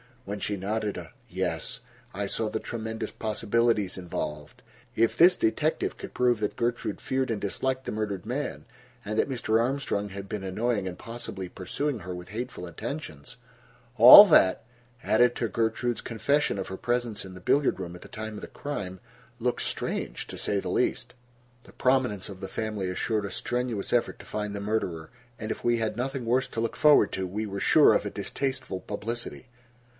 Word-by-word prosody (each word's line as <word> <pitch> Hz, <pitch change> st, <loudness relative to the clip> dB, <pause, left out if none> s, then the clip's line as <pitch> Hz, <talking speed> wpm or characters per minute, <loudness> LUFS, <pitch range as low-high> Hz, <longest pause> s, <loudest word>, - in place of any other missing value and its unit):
When 100 Hz, +1 st, -4 dB
she 105 Hz, -, -2 dB
nodded 105 Hz, +2 st, -2 dB
a -, -, -8 dB, 0.2 s
"yes" -, -, -3 dB, 0.3 s
I 100 Hz, +1 st, -2 dB
saw 110 Hz, +2 st, -1 dB
the 110 Hz, -, -2 dB
tremendous 110 Hz, -1 st, -5 dB
possibilities 110 Hz, -2 st, 0 dB
involved. 75 Hz, -4 st, -5 dB, 0.3 s
If 115 Hz, 0 st, +3 dB
this 180 Hz, +2 st, +7 dB
detective 155 Hz, +6 st, 0 dB
could -, -, -8 dB
prove 125 Hz, -2 st, +2 dB
that 105 Hz, -, -2 dB
Gertrude 120 Hz, 0 st, -2 dB
feared 130 Hz, -1 st, -1 dB
and 110 Hz, -3 st, -1 dB
disliked 130 Hz, +6 st, -2 dB
the -, -, -3 dB
murdered 105 Hz, -4 st, -3 dB
man, -, -, -3 dB, 0.4 s
and 105 Hz, +2 st, -1 dB
that -, -, +2 dB
Mr. 115 Hz, -4 st, +1 dB
Armstrong 120 Hz, -5 st, -1 dB
had 100 Hz, 0 st, -8 dB
been 105 Hz, -3 st, -4 dB
annoying 100 Hz, +1 st, -1 dB
and 90 Hz, -, -5 dB
possibly 115 Hz, -5 st, -6 dB
pursuing 130 Hz, +9 st, -3 dB
her 90 Hz, -1 st, -6 dB
with 90 Hz, 0 st, -9 dB
hateful 110 Hz, -4 st, -5 dB
attentions, 85 Hz, -, -7 dB, 0.6 s
all -, -, +13 dB
that, 95 Hz, +3 st, +5 dB, 0.4 s
added 120 Hz, +2 st, +4 dB
to 115 Hz, -, -1 dB
Gertrude's 115 Hz, +2 st, -1 dB
confession 140 Hz, +1 st, 0 dB
of 95 Hz, -, -4 dB
her 95 Hz, -, -5 dB
presence 120 Hz, -2 st, -1 dB
in 95 Hz, -, -9 dB
the -, -, -9 dB
billiard 140 Hz, +3 st, +2 dB
room 90 Hz, -2 st, -5 dB
at 90 Hz, -, -12 dB
the -, -, -11 dB
time 110 Hz, 0 st, -6 dB
of -, -, -7 dB
the -, -, -7 dB
crime, 100 Hz, -11 st, -5 dB, 0.4 s
looked -, -, 0 dB
strange, -, -, -3 dB
to -, -, -8 dB
say 100 Hz, -, 0 dB
the -, -, -4 dB
least. -, -, 0 dB, 0.5 s
The -, -, -17 dB
prominence 125 Hz, -7 st, +1 dB
of 95 Hz, -2 st, -9 dB
the 95 Hz, -, -5 dB
family 105 Hz, -4 st, -3 dB
assured 105 Hz, +3 st, -1 dB
a 100 Hz, -, -5 dB
strenuous 120 Hz, -4 st, -2 dB
effort 120 Hz, -, +1 dB
to -, -, -12 dB
find 105 Hz, -1 st, -4 dB
the -, -, -3 dB
murderer, 100 Hz, -6 st, -2 dB, 0.3 s
and 110 Hz, -1 st, -4 dB
if -, -, -5 dB
we 120 Hz, 0 st, +3 dB
had 110 Hz, -1 st, -2 dB
nothing 130 Hz, 0 st, -2 dB
worse 125 Hz, +3 st, +2 dB
to 115 Hz, -, -4 dB
look 115 Hz, -, -2 dB
forward 150 Hz, -8 st, +5 dB
to, 95 Hz, -1 st, -2 dB
we 105 Hz, +4 st, -3 dB
were 100 Hz, -1 st, -4 dB
sure -, -, +6 dB
of -, -, +1 dB
a -, -, -2 dB
distasteful 130 Hz, -8 st, -3 dB
publicity. 115 Hz, +5 st, -5 dB
110 Hz, 185 wpm, -27 LUFS, 95-120 Hz, 0.6 s, all